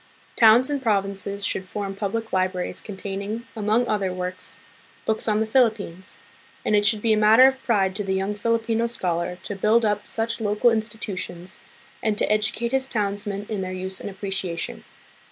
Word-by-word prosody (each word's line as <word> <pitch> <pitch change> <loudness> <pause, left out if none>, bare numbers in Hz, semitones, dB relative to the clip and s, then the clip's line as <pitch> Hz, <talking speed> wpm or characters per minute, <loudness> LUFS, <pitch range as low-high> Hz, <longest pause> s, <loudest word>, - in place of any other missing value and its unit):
Towns 235 +4 +6
and 285 -2 -1
provinces 200 -2 0
should 185 -1 -2
form 200 -2 -4
public 220 +3 -3
libraries 185 -1 -1
containing, 200 +3 -5
among 220 +3 +1
other 195 -3 0
works, 180 0 -6 0.5
books 220 +1 -1
on 215 0 +2
the - - +2
Philippines; 215 -7 +1 0.5
and 210 - +3
it 205 0 +4
should 215 -1 +2
be 225 -1 +4
a - - +2
matter 220 +4 +7
of 265 0 +3
pride 195 -5 +1
to 205 - -1
the 190 -1 -1
young 195 +2 -1
Filipino 230 +1 0
scholar 180 -5 -2
to 205 - -4
build 220 +4 +3
up 210 -1 0
such 230 +1 -3
local 210 +3 +3
institutions, 210 -5 -3 0.4
and 215 -3 0
to - - +2
educate 215 +2 +1
his 265 0 +1
townsmen 205 -3 -2
in 210 -3 -3
their 185 0 -4
use 185 +1 -5
and - - -5
appreciation. 190 -3 -4
210 Hz, 170 wpm, -24 LUFS, 195-225 Hz, 0.5 s, matter